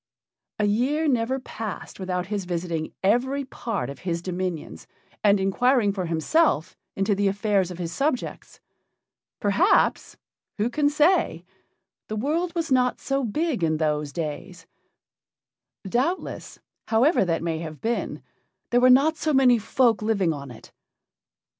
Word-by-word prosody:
A 210 - +1
year 260 +10 +1
never 255 0 +1
passed 220 -6 -7
without 180 -1 -2
his 200 -1 -3
visiting 170 -2 -3
every 260 +7 +1
part 230 -4 -4
of 140 -1 -8
his 170 -2 -3
dominions 180 - -4 0.4
and 205 -1 +5
inquiring 210 +2 +2
for 185 -3 -3
himself 165 - +1 0.2
into 195 +2 +1
the 200 0 +1
affairs 200 -2 +1
of 180 - -7
his 170 -2 -4
subjects. 275 - -3 0.8
Perhaps 260 - +2 0.4
who 220 +3 0
can 290 0 +2
say? 305 +5 +2 0.6
the 215 - -4
world 320 - -1
was 330 -3 -2
not 250 -1 +2
so 275 0 -1
big 265 - -1
in 155 -1 +1
those 150 -2 -1
days; 165 +2 -6 1.2
doubtless, 270 - -2 0.3
however 235 - +3
that 165 -3 -1
may 165 -1 -2
have 155 -2 -7
been, 230 +1 -3 0.5
there 245 0 +4
were 255 - +6
not 285 +5 +5
so 305 -2 0
many 250 -3 +5
folk 235 0 +2
living 200 -6 +1
on 140 -2 -8
it. 120 - -13
210 Hz, 140 wpm, -25 LUFS, 175-265 Hz, 1.2 s, were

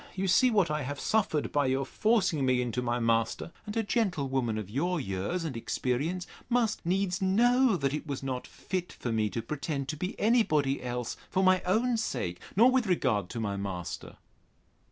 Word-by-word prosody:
You 190 0 -1
see 220 +8 +5
what 200 -9 +2
I 150 0 -1
have 145 +2 -4
suffered 195 -9 0
by 145 -2 +2
your 135 +1 +1
forcing 205 -10 +1
me 130 -1 +3
in 125 -1 -1
to 125 - -1
my 120 -1 0
master: 115 +6 0 0.2
and 210 +2 -4
a 225 - +2
gentlewoman 140 - 0
of 105 -3 -4
your 165 - -1
years 100 - -2
and 155 -6 -4
experience 140 +10 -2 0.2
must 235 -3 +1
needs 185 +1 0
know, 235 +4 +4
that 140 -3 0
it 150 - -4
was 140 -2 -4
not 130 -2 -3
fit 180 -1 -4
for 120 - -4
me 110 -1 +1
to 115 +2 -4
pretend 140 +1 -3
to 155 - -2
be 180 +6 -4
any 230 +3 +4
body 145 -8 +1
else 125 -1 -4
for 190 - +1
my 185 -1 +5
own 230 +5 +2
sake, 90 - -2 0.2
nor 235 +6 +6
with 255 -4 +2
regard 105 - +1
to 120 - -5
my 100 -3 -2
master. 95 -3 -5
150 Hz, 195 wpm, -29 LUFS, 125-195 Hz, 0.2 s, nor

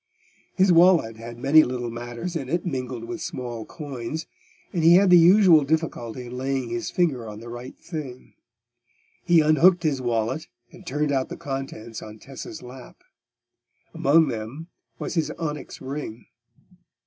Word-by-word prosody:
His 190 -1 +4
wallet 170 -10 +5
had 115 +1 -9
many 145 +6 +6
little 125 -2 -3
matters 120 +9 -6
in 135 -5 -4
it 170 +4 -1
mingled 130 -6 -4
with 170 +8 -6
small 120 -3 -5
coins, 145 +1 -6 0.5
and 170 - 0
he 170 +2 +8
had 190 0 +5
the - - +9
usual 175 -2 +7
difficulty 135 -6 -2
in 120 +1 -8
laying 130 -1 -2
his 120 0 -3
finger 140 -10 0
on 105 0 -8
the 115 +1 -10
right 120 +2 -8
thing. 145 -7 -8 0.9
He 170 -2 +6
unhooked 165 +4 +4
his 145 -5 0
wallet, 120 +4 -1 0.2
and - - -15
turned 145 +2 0
out 135 -2 0
the - - -7
contents 135 -5 -6
on 110 0 -10
Tessa's 135 +6 -9
lap. 125 +1 -12 0.9
Among 155 +3 +4
them 120 +8 -6 0.3
was - - -4
his 165 -3 0
onyx 150 -3 -5
ring. 130 -4 -6
135 Hz, 155 wpm, -24 LUFS, 120-160 Hz, 0.9 s, the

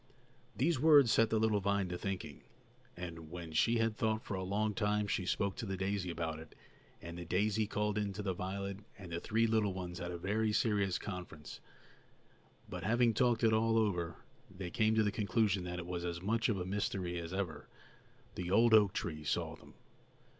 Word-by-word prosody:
These 150 +2 +1
words 145 -5 +7
set 115 0 +4
the 110 - +2
little 110 -1 +2
vine 100 -1 +1
to 90 - -3
thinking; 90 -6 -5 0.6
and 85 -3 -7
when 85 -1 -7
she 115 +9 +3
had 115 -1 +1
thought 110 0 0
for - - -4
a 95 - -2
long 105 +3 0
time 105 0 +1
she 95 -2 -1
spoke 100 -1 0
to - - -4
the 95 0 -3
daisy 95 -1 -1
about 80 -2 -3
it, 80 - -12 0.5
and 85 0 -7
the - - -5
daisy 105 +5 +1
called 105 0 0
in 105 -1 -1
the 100 -1 -2
violet, 100 +2 -4 0.2
and 95 -4 -10
the 85 - -2
three 115 +5 +1
little 110 -4 +1
ones 90 -2 -5
had 90 - -4
a 90 - -4
very 105 +4 0
serious 100 -4 +2
conference; 90 -6 -7 1.1
but, 90 -2 -6
having 120 +3 +3
talked 120 0 +2
it 110 -1 +5
all 115 +1 +3
over, 90 -6 0 0.3
they 95 -2 -7
came 110 +1 +2
to 110 - +4
the 105 - +1
conclusion 100 -3 +1
that 90 0 -4
it 90 - -5
was 90 -1 -4
as 85 -1 -3
much 110 +5 0
of 105 - +1
a 90 - -3
mystery 95 -3 -2
as 85 0 -6
ever. 90 -6 -3 0.7
The 90 -1 -4
old 115 +4 +5
oak 105 -3 +6
tree 75 -2 -3
saw 75 - -1
them. - - -17
100 Hz, 200 wpm, -34 LUFS, 90-110 Hz, 1.1 s, words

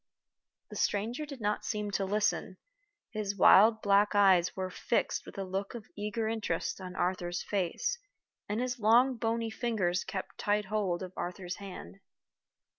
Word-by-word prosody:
The - - -7
stranger 235 +9 -1
did 275 -4 -9
not 210 0 0
seem 210 -1 -2
to 195 0 0
listen. 205 +2 0 0.5
His 210 -2 -3
wild 220 +4 +7
black 205 +1 +4
eyes 190 -3 +5
were 185 -1 -3
fixed 230 - -1
with - - -10
a 195 - -2
look 195 +3 -4
of 225 -3 -7
eager 210 +2 -2
interest 195 -6 -2
on 185 0 -7
Arthur's 175 -1 -1
face, 205 - -1 0.5
and 210 +2 -1
his 250 0 -2
long 240 +5 +5
bony 230 0 -1
fingers 210 -7 0
kept 190 - -6
tight 210 0 +1
hold 190 -3 -1
of 185 0 -8
Arthur's 180 0 -5
hand. 180 - -9
205 Hz, 155 wpm, -31 LUFS, 185-220 Hz, 0.5 s, wild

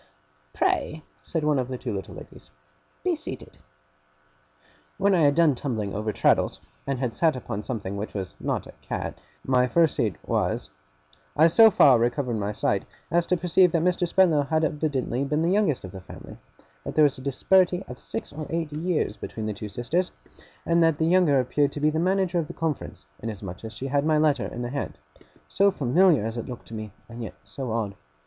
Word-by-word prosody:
'Pray,' 155 - 0 0.2
said 160 -2 -3
one 150 -2 +2
of 125 - -1
the 130 -1 -4
two - - -4
little 95 -1 -6
ladies, - - -12 0.5
'be - - +1
seated.' - - -8 1.4
When 200 +1 +3
I 180 - +4
had 145 0 +4
done 165 -3 +5
tumbling 115 -7 -3
over 105 +1 -2
Traddles, - - +2 0.3
and 135 -1 -1
had 125 -3 -2
sat 160 +2 +2
upon 110 -4 -5
something 105 -5 -4
which 105 +2 -5
was 95 -2 -4
not - - -2
a - - -11
cat - - -5 0.2
my 125 -1 +3
first 165 +3 +3
seat 110 -8 0
was - - -1 0.7
I 155 - +7
so 220 +7 +7
far 135 - +6
recovered 120 0 0
my 100 0 -2
sight, 105 - 0 0.3
as 170 +1 +2
to 180 - +2
perceive 180 +1 +4
that 165 -1 +2
Mr. 180 0 +1
Spenlow 170 -4 +4
had 160 +2 +1
evidently 145 -4 -1
been 150 +3 0
the 170 - +2
youngest 195 - +1
of 95 - -9
the 95 -1 -9
family; - - -11 0.5
that - - -6
there 155 - +6
was 145 -3 +2
a - - -9
disparity 180 +7 +2
of 125 - -9
six - - -5
or 155 0 -6
eight 165 -2 -2
years 155 - -1
between 110 - -6
the 110 - -2
two 105 +1 -7
sisters; 155 - -1 0.6
and 170 0 +3
that 165 -2 +3
the 160 - +1
younger 165 -5 +4
appeared 140 +3 +1
to - - -5
be 150 +1 +3
the 160 - -1
manager 185 0 +1
of 160 - -2
the - - -8
conference, 155 - -4
inasmuch 100 -4 -7
as 110 - -6
she 130 - -6
had 140 +1 +1
my 155 0 +3
letter 150 -4 +2
in 120 - -6
her 120 - -3
hand 140 +2 -4 0.5
so 200 +1 +3
familiar 155 - +3
as 115 +1 -4
it 115 - -6
looked 125 - -8
to - - -10
me, 110 -1 -6 0.2
and 115 +1 -9
yet 115 - -6
so 130 -4 -6
odd! 110 -3 -1
145 Hz, 205 wpm, -25 LUFS, 115-165 Hz, 1.4 s, I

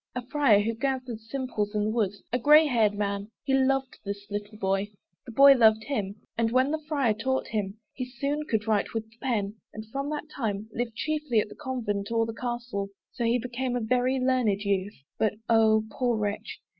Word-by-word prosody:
A 250 -1 -4
Friar, 255 -6 +4
who 225 +2 -1
gathered 255 -2 -2
simples 225 -3 -3
in 210 - +1
the 210 - 0
wood, 215 -4 +1 0.2
A 250 - +2
grey 300 +5 +7
haired 225 -7 +2
man 200 0 -2
he 270 - 0
loved 270 0 +1
this 200 0 -5
little 205 +1 -5
boy, 195 0 0 0.4
The - - -6
boy 275 +4 +8
loved 220 -3 +5
him 205 -8 -2 0.2
and, 230 -1 +1
when 260 +3 +3
the 315 0 -1
Friar 280 -8 +2
taught 260 +5 -1
him, 205 -2 -2 0.2
He 255 - -4
soon 280 +4 -3
could 220 -2 0
write 215 0 +1
with 225 - 0
the 225 - -24
pen: 220 -5 -1
and 215 0 -8
from 275 +2 -3
that 300 0 -4
time, 215 -4 -2
Lived 235 -2 -3
chiefly 300 -4 0
at 210 - -1
the - - -11
Convent 230 -8 -3
or 230 0 +2
the 225 - -5
Castle. 240 -4 -3 0.2
So 240 - -3
he 235 +2 +3
became 250 +1 -3
a - - +1
very 250 +3 +1
learned 250 -6 +2
youth. 200 0 -1 0.2
But 215 - +2
Oh! 220 -1 +4
poor 245 -3 0
wretch! 205 -1 -3
230 Hz, 205 wpm, -27 LUFS, 210-260 Hz, 0.4 s, boy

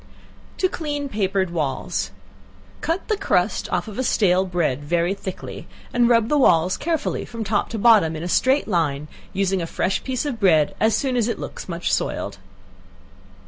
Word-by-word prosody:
To 375 - +2
Clean 295 -5 -3
Papered 195 -5 0
Walls. 150 -6 -2 0.7
Cut 330 +3 -2
the 430 - +1
crust 400 - 0
off - - -1
of 220 +4 -3
stale 190 -6 +3
bread 160 -6 -1
very 170 +4 +1
thick, 195 -2 -6 0.5
and 240 -1 +4
rub 230 -2 +4
the 295 +3 +2
walls 180 -7 +4
carefully 330 -2 -2
from 230 -1 -6
top 205 0 0
to 230 - -4
bottom, 205 -8 +5
in 155 - -5
a - - -3
straight 260 +9 +2
line, 150 -7 0 0.2
using 195 -1 0
a 165 - -3
fresh 190 +3 -1
piece 260 +1 -2
of 265 -6 -3
bread 160 -7 +4
as 220 0 +3
soon 265 -2 -1
as 235 -3 +2
it 235 - -2
looks - - -7
much - - -2
soiled. - - -2
200 Hz, 175 wpm, -22 LUFS, 175-250 Hz, 0.7 s, bottom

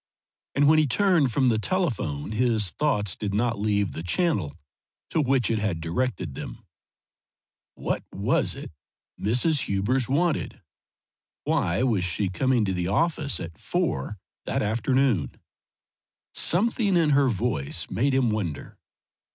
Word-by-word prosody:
And 145 +1 +4
when 155 +1 +6
he 155 - +3
turned 170 - +3
from 130 +2 +2
the 110 -2 +1
telephone 110 - -1
his 110 -4 +1
thoughts 105 - 0
did 100 -2 -3
not 115 0 0
leave 100 -2 +1
the - - -6
channel 90 - 0 0.5
to 160 - +2
which 130 -5 +1
it 110 - +1
had 100 -6 -1
directed 90 - -2
them. - - -8 1.1
What - - -2
was - - 0
it - - -8 0.5
Mrs. 135 - +2
Hubers 110 +6 0
wanted? 160 +3 0 0.8
Why 85 +6 +1
was 110 -8 +1
she 90 +3 -1
coming 125 +3 +1
to 95 - -1
the 90 -1 -2
office 145 - 0
at 85 -2 -8
four 65 +10 -2 0.3
that - - 0
afternoon? 115 - +1 1.0
Something 205 +1 +2
in 160 -3 +3
her 140 -1 +4
voice 105 - -2
made 135 +3 +1
him 125 -4 +2
wonder. 90 -9 -4
115 Hz, 135 wpm, -25 LUFS, 95-140 Hz, 1.1 s, when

